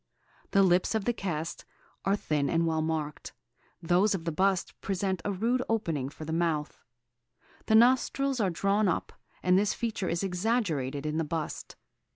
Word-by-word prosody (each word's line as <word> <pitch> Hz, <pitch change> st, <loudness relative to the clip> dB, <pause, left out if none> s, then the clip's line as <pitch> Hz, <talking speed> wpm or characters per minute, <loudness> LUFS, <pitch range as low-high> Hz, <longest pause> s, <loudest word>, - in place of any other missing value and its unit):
The 195 Hz, -, +4 dB
lips 180 Hz, +3 st, +3 dB
of 215 Hz, -3 st, -1 dB
the 240 Hz, -, +2 dB
cast 165 Hz, -6 st, -4 dB, 0.4 s
are 195 Hz, -, +3 dB
thin 150 Hz, -7 st, -1 dB
and 165 Hz, 0 st, +2 dB
well 160 Hz, -1 st, +1 dB
marked; 155 Hz, -2 st, -3 dB, 0.5 s
those 185 Hz, +5 st, +3 dB
of 165 Hz, -3 st, -6 dB
the 165 Hz, -, 0 dB
bust 190 Hz, +3 st, +1 dB
present 190 Hz, -2 st, -1 dB
a 205 Hz, -, -1 dB
rude 230 Hz, +6 st, 0 dB
opening 165 Hz, -12 st, -1 dB
for 155 Hz, +2 st, -9 dB
the 160 Hz, -, -3 dB
mouth. 160 Hz, -3 st, -1 dB, 0.9 s
The 220 Hz, -, +4 dB
nostrils 260 Hz, +3 st, +3 dB
are 200 Hz, -4 st, +2 dB
drawn 200 Hz, +4 st, +1 dB
up, 180 Hz, -, -1 dB, 0.3 s
and 180 Hz, +1 st, +4 dB
this 205 Hz, 0 st, +1 dB
feature 220 Hz, -5 st, -2 dB
is 170 Hz, +3 st, -1 dB
exaggerated 180 Hz, -, -1 dB
in 155 Hz, +1 st, -1 dB
the 165 Hz, -, +1 dB
bust. 160 Hz, 0 st, -4 dB
180 Hz, 170 wpm, -29 LUFS, 160-205 Hz, 0.9 s, The